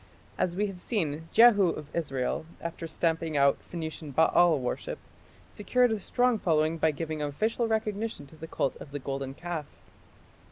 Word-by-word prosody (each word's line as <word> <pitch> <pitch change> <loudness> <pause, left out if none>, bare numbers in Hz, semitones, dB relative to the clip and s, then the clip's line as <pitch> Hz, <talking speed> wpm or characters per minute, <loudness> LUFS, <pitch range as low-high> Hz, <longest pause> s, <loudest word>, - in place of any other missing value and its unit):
As 175 - -1
we 205 +3 +1
have 195 -3 -6
seen, 160 - -2
Jehu 220 -4 +7
of 150 -2 -6
Israel, 140 -2 -2
after 170 0 -5
stamping 165 -2 -1
out 140 0 +4
Phoenician 160 -2 -5
Baal 160 +3 +4
worship, 125 -2 -3 0.5
secured 245 +3 +2
a 220 - 0
strong 245 +2 +1
following 160 -2 +1
by 160 - +4
giving 155 0 -4
official 215 +11 0
recognition 220 -5 -2
to 140 - -16
the 160 +1 -9
cult 135 - -1
of - - -10
the - - -2
golden 135 -1 -4
calf. 170 -3 -5
165 Hz, 160 wpm, -28 LUFS, 150-205 Hz, 0.5 s, Jehu